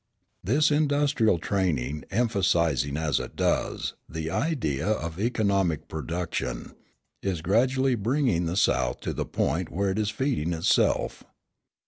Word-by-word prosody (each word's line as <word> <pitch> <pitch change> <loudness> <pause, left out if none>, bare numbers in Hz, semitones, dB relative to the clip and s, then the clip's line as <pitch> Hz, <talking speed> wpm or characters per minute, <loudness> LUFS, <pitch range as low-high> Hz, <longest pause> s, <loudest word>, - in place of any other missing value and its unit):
This 145 - +3
industrial 145 - +2
training, 80 -6 -1
emphasising, 85 - +1
as 75 -4 +1
it - - -7
does, - - 0 0.2
the 80 0 -4
idea 100 - -1
of 85 -5 -2
economic 100 - +1
production, 75 -5 -4 0.5
is 90 -5 -2
gradually 130 +7 +2
bringing 115 - +1
the 85 +3 -2
South 65 -9 +2
to - - -3
the - - -3
point 85 +5 -1
where 100 +3 0
it 100 - -2
is 105 -1 0
feeding 115 - -1
itself. 80 0 +1
95 Hz, 125 wpm, -26 LUFS, 80-120 Hz, 0.5 s, This